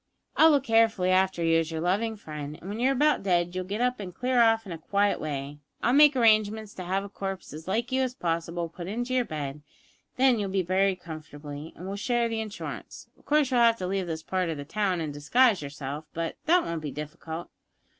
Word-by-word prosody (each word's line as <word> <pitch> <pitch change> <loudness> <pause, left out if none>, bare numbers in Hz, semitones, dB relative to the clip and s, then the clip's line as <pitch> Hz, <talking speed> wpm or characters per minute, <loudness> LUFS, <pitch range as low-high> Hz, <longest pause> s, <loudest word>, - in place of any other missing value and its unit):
I'll 320 - +7
look 285 -4 +3
carefully 225 -6 +3
after 185 -2 +2
you 165 0 +4
as 165 -1 -2
your 160 -1 -4
loving 205 +7 0
friend, 150 -6 -7
and 180 - -11
when 210 +3 -4
you're 260 +3 +3
about 295 +3 +3
dead 175 -2 +1
you'll 185 0 -3
get 205 +5 -3
up 250 -1 +1
and 185 -3 -7
clear 250 +1 +2
off 225 -1 +4
in 190 - -8
a 165 - -6
quiet 200 +5 +1
way. 145 -1 -4 0.2
I'll 245 - +3
make 295 0 +7
arrangements 215 -3 +3
to 185 - -7
have 190 +2 0
a - - -6
corpse 195 -3 -6
as 155 +3 -9
like 225 +7 -1
you 260 0 +2
as 255 -1 -1
possible 170 -2 -2
put 170 +1 -8
in 230 +5 -2
your 255 -1 +1
bed, 145 -4 -4
and 150 - -20 0.5
then 255 -3 +4
you'll 200 -2 -2
be 190 -1 0
buried 185 +1 +1
comfortably, 150 -1 -8
and 180 - -9
we'll 195 +1 -4
share 240 +2 +1
the 225 -1 -2
insurance. 215 -1 -7
Of - - -27
course 295 -2 +2
you'll 250 - +3
have 230 -1 +5
to 185 - -4
leave 190 0 -1
this 160 -1 -4
part 185 -2 -1
of 160 - -3
the 145 - -6
town 190 0 0
and 155 -2 -3
disguise 205 - +3
yourself, 145 +1 -6
but 165 0 -2
that 350 +2 +5
won't 170 -1 -3
be 150 - -4
difficult. 155 +3 -7
190 Hz, 235 wpm, -27 LUFS, 165-230 Hz, 0.5 s, I'll